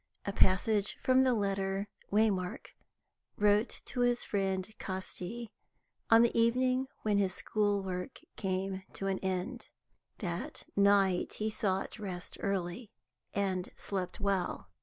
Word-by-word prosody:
A 200 - -2
passage 200 +2 +3
from 260 0 +5
the 255 -2 +4
letter 195 -1 0 0.2
Waymark 200 -4 +1 0.7
wrote 210 +2 +2
to - - -3
his 245 0 +3
friend 190 -2 0
Casti, 190 +4 -5 0.6
on 225 0 +8
the 235 - +2
evening 255 +3 +3 0.2
when 210 -2 +3
his 190 -2 +1
school 205 -2 +1
work 185 +5 -4 0.2
came 190 0 -2
to 195 - -5
an 195 -1 0
end. 190 +6 -3 0.5
That - - -4
night 200 -2 +4
he 215 +1 -1
sought 195 +1 -1
rest 185 -4 -6
early, 195 +3 -2 0.5
and 190 -2 0
slept 190 -3 -4
well. 190 - -1
200 Hz, 125 wpm, -32 LUFS, 190-220 Hz, 0.7 s, on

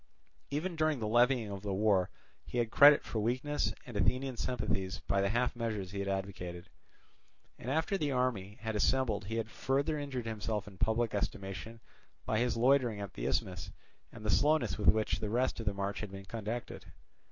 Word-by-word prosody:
Even 165 +5 -2
during 155 -2 +2
the 110 -3 -2
levying 120 -1 +3
of 100 -1 -5
the 100 -1 -2
war 100 -3 +3 0.3
he - - -6
had 115 -2 +1
credit 145 0 +8
for 110 - -3
weakness 130 +7 0
and 120 - -9
Athenian 130 +6 +1
sympathies 105 -7 -2
by 100 0 +2
the 100 - +2
half 120 +4 +1
measures 110 -6 -3
he 100 - -4
had 100 - -2
advocated; 95 -2 -4 0.9
and 120 - -5
after 160 +7 +1
the 150 -3 0
army 115 -6 -1
had 110 -1 -3
assembled 110 -3 +1
he 110 +3 -4
had 115 0 -2
further 140 +3 0
injured 135 -4 -4
himself 110 -2 -3
in 95 -3 -12
public 115 0 +1
estimation 100 +2 -4 0.5
by 110 - +1
his 120 -1 +1
loitering 125 -3 +3
at 100 -2 -6
the - - -3
Isthmus 90 -3 -1 0.4
and 110 -2 -10
the 105 - +2
slowness 150 -4 +3
with 105 - -2
which 110 0 +3
the 105 - -3
rest 125 +3 +1
of 115 - -5
the 100 - +2
march 100 0 -2
had 105 - -5
been 95 0 -8
conducted. 115 +3 -5
110 Hz, 190 wpm, -33 LUFS, 100-125 Hz, 0.9 s, credit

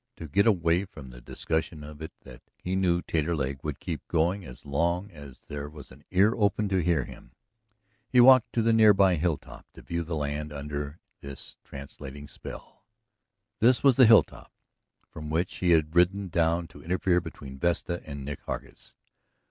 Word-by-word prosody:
To 80 - -8
get 100 +9 +2
away 90 -2 +2
from 75 -8 -12
the - - -13
discussion 80 +4 -3
of 75 +1 -11
it 80 - -6
that - - -14 0.2
he 90 +1 -3
knew 90 -2 +1
Taterleg 75 -4 -2
would 75 -3 -4
keep - - -6
going 85 +4 0
as 65 -3 -12
long 85 +7 -1
as 70 -5 -12
there 75 0 -7
was 75 -1 -12
an 70 +3 -16
ear 100 +4 +4
open 105 0 +1
to 95 -2 +1
hear 80 -5 +1
him, - - -14 0.8
he 125 - +4
walked 130 0 +7
to 115 - +1
the 115 0 +3
near 110 -2 +6
by 95 -2 +4
hilltop 85 -2 -3
to - - -13
view 85 0 -3
the 85 0 -4
land 75 0 -3
under 75 +1 -5 0.2
this 70 -1 -10
translating 70 +1 -10
spell. - - -11 0.8
This 120 +3 +4
was 135 -3 +6
the 130 -2 +7
hilltop 110 -1 +4 0.6
from 75 -1 -9
which 85 +3 -1
he 90 - 0
had 80 -2 +3
ridden 95 +2 +2
down 85 0 +1
to - - -14
interfere 90 +1 +1
between 65 -5 -10
Vesta 85 +1 -1
and 70 -3 -8
Nick 70 0 -6
Hargus. - - -7
85 Hz, 180 wpm, -27 LUFS, 75-95 Hz, 0.8 s, walked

